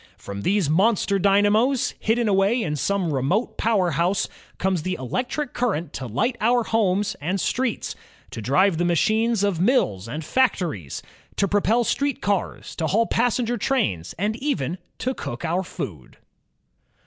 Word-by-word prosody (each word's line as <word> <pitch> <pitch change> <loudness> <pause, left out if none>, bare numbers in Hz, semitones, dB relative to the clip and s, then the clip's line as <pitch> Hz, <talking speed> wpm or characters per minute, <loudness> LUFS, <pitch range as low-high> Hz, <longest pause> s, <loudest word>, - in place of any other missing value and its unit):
From 100 0 -7
these 195 - +1
monster 200 +4 +2
dynamos, 205 +6 +3
hidden 230 +1 +1
away 200 +4 +2
in 150 -2 -2
some 180 +1 0
remote 145 - 0
power 200 -6 +2
house, 175 +6 +1 0.3
comes 185 -3 0
the 185 +3 -2
electric 250 - -3
current 175 - -1
to 130 - -5
light 225 - 0
our 240 +2 +3
homes 205 -3 +1
and 180 +6 -1
streets, 250 +4 -1 0.4
to 115 - -6
drive 165 - +3
the - - +2
machines 215 +5 +2
of 200 -5 +1
mills 115 - +2
and 150 +6 -5
factories, 170 - 0 0.3
to 200 - +1
propel 205 +4 +2
street 280 +3 0
cars, 200 -2 -2
to 160 - 0
haul 225 +7 +2
passenger 240 +1 +1
trains, 100 - -1
and 210 +4 0
even 185 - -2 0.2
to 260 - -1
cook 120 - -6
our 170 +3 0
food. 85 - -7
200 Hz, 150 wpm, -23 LUFS, 160-230 Hz, 0.4 s, dynamos